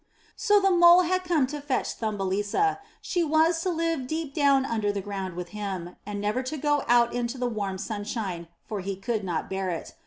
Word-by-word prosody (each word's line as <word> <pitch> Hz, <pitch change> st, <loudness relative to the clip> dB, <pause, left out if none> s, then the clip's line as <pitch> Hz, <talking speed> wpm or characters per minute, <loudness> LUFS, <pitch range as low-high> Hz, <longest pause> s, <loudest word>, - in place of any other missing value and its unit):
So 415 Hz, -2 st, +4 dB
the 390 Hz, -1 st, +3 dB
Mole 345 Hz, 0 st, +7 dB
had 370 Hz, +1 st, 0 dB
come 335 Hz, -7 st, +2 dB
to 290 Hz, +3 st, -6 dB
fetch 280 Hz, -2 st, -1 dB
Thumbelisa; 205 Hz, -, 0 dB, 0.2 s
she 350 Hz, -2 st, 0 dB
was 320 Hz, +2 st, +3 dB
to 370 Hz, -, -1 dB
live 330 Hz, -6 st, -1 dB
deep 315 Hz, -1 st, -3 dB
down 280 Hz, -3 st, +3 dB
under 220 Hz, -5 st, 0 dB
the 205 Hz, -, -3 dB
ground 195 Hz, -2 st, -5 dB
with 175 Hz, 0 st, -5 dB
him, 190 Hz, -4 st, -5 dB
and 205 Hz, -1 st, -4 dB
never 210 Hz, +5 st, 0 dB
to 265 Hz, +4 st, -4 dB
go 290 Hz, 0 st, +1 dB
out 240 Hz, 0 st, +4 dB
into 245 Hz, +1 st, -2 dB
the 250 Hz, -, -1 dB
warm 205 Hz, -5 st, -2 dB
sunshine, 205 Hz, -4 st, -4 dB, 0.2 s
for 210 Hz, -, -3 dB
he 195 Hz, +1 st, -3 dB
could 215 Hz, +2 st, -2 dB
not 175 Hz, -4 st, -2 dB
bear 190 Hz, -1 st, -2 dB
it. 170 Hz, -2 st, -5 dB
240 Hz, 205 wpm, -26 LUFS, 200-315 Hz, 0.2 s, Mole